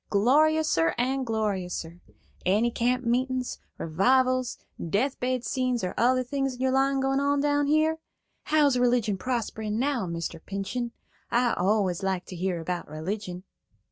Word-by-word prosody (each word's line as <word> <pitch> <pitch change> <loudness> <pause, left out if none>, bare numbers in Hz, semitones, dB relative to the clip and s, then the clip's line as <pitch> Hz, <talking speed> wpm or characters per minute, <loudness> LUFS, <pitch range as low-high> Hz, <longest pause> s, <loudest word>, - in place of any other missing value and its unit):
Gloriouser 275 - +3
and 260 +1 0
gloriouser. 185 -6 -2 0.4
Any 210 +6 +2
camp 250 +2 0
meetin's, 255 +1 0 0.2
revivals, 255 +9 +2 0.3
death 255 - 0
bed 250 -1 -1
scenes, 255 -3 -1
or 180 - -2
other 255 +2 +3
things 270 0 -2
in - - -15
your 260 0 +2
line 270 +1 +2
going 270 0 +1
on 285 0 +2
down 290 0 +2
here? 310 +2 +2 0.5
How's 290 -4 +3
religion 240 -5 +2
prospering 220 -3 -2
now, 255 -5 0
Mr. 170 -1 -5
Pinchen? 230 +5 -3 0.4
I 240 0 +2
always 190 -1 +1
like 190 -2 -1
to 185 - -8
hear 180 0 -1
about 175 0 -4
religion." 180 +4 -5
240 Hz, 140 wpm, -27 LUFS, 195-265 Hz, 0.5 s, Gloriouser